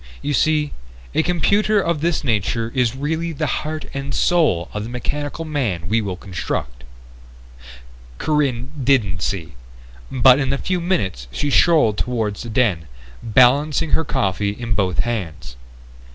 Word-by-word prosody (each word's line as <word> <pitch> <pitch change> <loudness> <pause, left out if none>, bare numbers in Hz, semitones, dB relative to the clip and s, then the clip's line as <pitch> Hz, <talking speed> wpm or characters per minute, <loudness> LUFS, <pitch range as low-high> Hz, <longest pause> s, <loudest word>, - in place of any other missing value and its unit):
You 145 - -1
see, 150 +1 +1 0.4
a - - +3
computer 200 +5 +2
of 170 -5 -1
this 170 0 0
nature 115 -1 0
is 125 -2 +1
really 160 +4 -2
the 155 +1 -2 0.2
heart 155 0 -5
and 140 -1 -4
soul 155 - +2
of 105 - -3
the 115 - -6
mechanical 145 +6 -4
man 115 - -2
we 110 +4 +2
will 100 -3 -3
construct." 85 -10 -5 1.3
Corinne 135 - 0
didn't 110 -9 +2
see, 85 -4 -3 0.6
but 130 +1 +6
in 135 -2 0
a 140 - 0
few 180 +4 -2
minutes 95 - -1
she 145 - -2
strolled 150 - +4
toward 110 -5 -1
the 120 - -7
den, 105 -9 +1 0.3
balancing 135 +7 +3
her 160 - +2
coffee 100 - 0
in 115 -2 -2
both 95 -4 0
hands. 95 - -3
125 Hz, 145 wpm, -20 LUFS, 105-150 Hz, 1.3 s, but